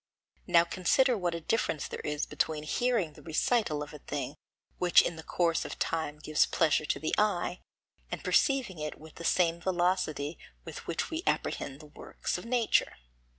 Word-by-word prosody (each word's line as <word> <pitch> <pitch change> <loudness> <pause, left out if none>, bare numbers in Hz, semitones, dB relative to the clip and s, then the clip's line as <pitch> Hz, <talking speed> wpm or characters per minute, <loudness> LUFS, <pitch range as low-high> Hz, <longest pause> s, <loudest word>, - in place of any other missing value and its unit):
Now 170 -2 +6
consider 215 +9 +2
what 175 -4 -1
a - - -3
difference 160 -4 0
there - - -6
is 150 0 -2
between 155 -1 -1
hearing 205 -1 0
the - - -14
recital 160 -1 +1
of 145 - -10
a 150 - -9
thing 145 +1 -4 0.4
which 180 -1 +6
in 170 - -2
the 160 - -8
course 165 0 +1
of - - -6
time 160 -2 -2
gives 155 0 +2
pleasure 155 -2 +2
to - - -1
the 155 - -2
eye, 195 -4 +1 0.5
and - - -4
perceiving 260 - +2
it 150 0 -4
with 155 0 -13
the - - -6
same 170 -1 +2
velocity 175 -5 0 0.3
with - - -8
which - - -2
we 320 +1 -2
apprehend 140 +2 -1
the - - -12
works 150 +3 -5
of 180 - -10
nature. 235 -2 +2
170 Hz, 180 wpm, -30 LUFS, 155-190 Hz, 0.5 s, Now